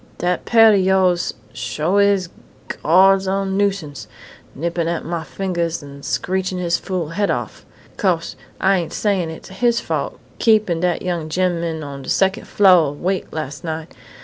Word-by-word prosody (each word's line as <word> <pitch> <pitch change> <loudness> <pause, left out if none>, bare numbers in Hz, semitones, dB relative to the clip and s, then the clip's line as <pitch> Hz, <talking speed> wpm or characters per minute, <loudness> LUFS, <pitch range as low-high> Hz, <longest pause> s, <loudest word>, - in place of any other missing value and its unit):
Dat 180 0 -1
parrot 225 -2 +6
o' - - +2
yoahs 185 -2 +2 0.2
sho 150 - -1
is 200 -3 +3 0.5
Gawd's 190 +4 +5
own 195 0 -1
nuisance 195 -8 -1 0.5
nippin' 170 +3 -2
at 170 0 -2
mah 165 0 -3
fingahs 170 -5 -3
an' 140 0 -11
screechin' 185 +4 -2
his 175 -1 0
fool 180 -5 -3
head 200 +5 -1
off.... - - -4 0.3
'Cose 180 -5 0 0.2
I 195 0 +3
ain't 170 -3 -4
sayin' 195 -6 0
it's 160 - -9
his 235 +5 +1
fault - - -3 0.2
keepin' 215 -7 +3
dat 175 0 0
young 170 -3 -2
gemman 170 -2 -1
on 140 -1 -7
de - - -8
secon' 190 0 +1
flo' 185 -6 +5
awake 180 +7 -2
las' 155 -2 -5
night.... 160 -1 -5
180 Hz, 155 wpm, -20 LUFS, 165-195 Hz, 0.5 s, parrot